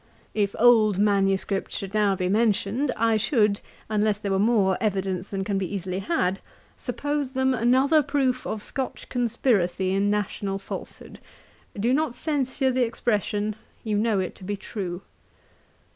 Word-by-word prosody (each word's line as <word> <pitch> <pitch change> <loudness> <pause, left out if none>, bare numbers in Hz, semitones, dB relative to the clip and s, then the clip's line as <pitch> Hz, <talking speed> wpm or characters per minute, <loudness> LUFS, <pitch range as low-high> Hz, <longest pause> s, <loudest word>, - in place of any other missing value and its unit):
If 205 -2 0
old 220 -4 +5
manuscripts 195 -1 +1
should 195 0 -6
now 210 -2 +3
be 185 -1 -1
mentioned, 220 +5 +1
I 225 0 +3
should, 210 -4 +2 0.3
unless 215 -1 +1
there 205 -1 -4
were 190 - +2
more 205 -3 +3
evidence 190 -3 -1
than 195 -1 -2
can 195 0 -1
be 190 -1 -3
easily 185 0 -3
had, 195 - 0 0.4
suppose 290 -2 -3
them 265 0 +2
another 260 +6 +4
proof 275 -3 0
of 215 -1 -4
Scotch 265 -2 -4
conspiracy 220 -7 +1
in 200 +1 +2
national 205 -1 -1
falsehood. 195 - -8 0.6
'Do 235 +5 +2
not 295 -3 0
censure 270 -3 0
the 255 0 +2
expression; 215 -2 -1 0.3
you 215 -2 -1
know 210 -1 +2
it 185 - -2
to - - -14
be 205 +2 -3
true. 190 -3 -5
210 Hz, 150 wpm, -25 LUFS, 195-245 Hz, 0.6 s, old